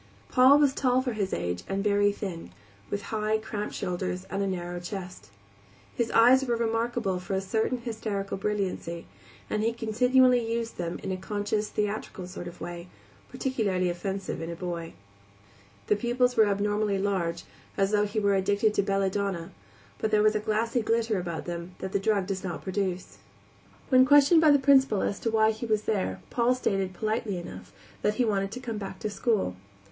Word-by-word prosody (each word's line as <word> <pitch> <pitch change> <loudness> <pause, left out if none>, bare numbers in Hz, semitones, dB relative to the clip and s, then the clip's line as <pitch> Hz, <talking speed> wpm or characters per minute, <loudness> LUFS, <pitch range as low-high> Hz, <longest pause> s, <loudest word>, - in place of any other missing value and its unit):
Paul 260 +3 +7
was 290 -2 +4
tall 255 -2 +2
for 250 -3 -2
his 200 -3 -2
age 90 0 -2
and 195 0 -1
very 205 0 +3
thin, 180 - -6 0.4
with 200 0 -3
high, 215 0 +1
cramped 215 -1 -5
shoulders 180 +1 -3
and 195 - -1
a 200 - 0
narrow 175 -1 -3
chest. 180 - -7 0.7
His 235 -1 0
eyes 250 +4 +6
were 240 -3 0
remarkable 230 -4 -1
for 185 +2 -4
a - - +1
certain 220 +6 -1
hysterical 220 -4 -4
brilliancy, 190 -4 -3 0.4
and 215 - -1
he 225 +1 +2
continually 250 +2 +3
used 230 -2 -3
them 170 -1 -3
in 195 - -3
a 185 - -2
conscious, 210 +2 -2
theatrical 210 -3 -3
sort 180 -1 -7
of 175 - -10
way, 175 0 -7 0.4
peculiarly 200 -9 0
offensive 190 +1 -4
in 165 - -4
a 170 - -4
boy. 170 -1 -5 0.9
The - - +3
pupils 245 +3 +1
were 220 -1 +5
abnormally 205 0 0
large, 185 -4 -1 0.3
as 195 0 +2
though 210 0 +2
he 210 +2 -2
were 200 -1 +2
addicted 200 +2 +2
to 200 - +2
belladonna, 195 -3 -1 0.5
but 220 - 0
there 210 -1 +3
was 215 0 +4
a 215 - 0
glassy 220 +3 0
glitter 225 -2 +1
about 170 -3 -4
them 175 +1 -6
which 190 - -5
that 200 - 0
drug 200 -2 +1
does 190 0 -4
not 175 -3 -5
produce. 190 -2 -3 0.7
When 255 -1 +6
questioned 290 +4 +6
by 315 - +6
the 290 - +7
Principal 270 -6 +4
as 200 - -1
to 230 - -1
why 220 0 +4
he 220 +2 -5
was 215 -1 +1
there 140 - -1
Paul 245 +1 +2
stated, 195 -6 -1
politely 215 0 -2
enough, 175 - -9 0.3
that 210 0 +1
he 245 - +2
wanted 195 -3 0
to 255 - -5
come 230 -4 -5
back 195 -1 -6
to - - -1
school. 205 - 0
205 Hz, 185 wpm, -27 LUFS, 190-230 Hz, 0.9 s, Paul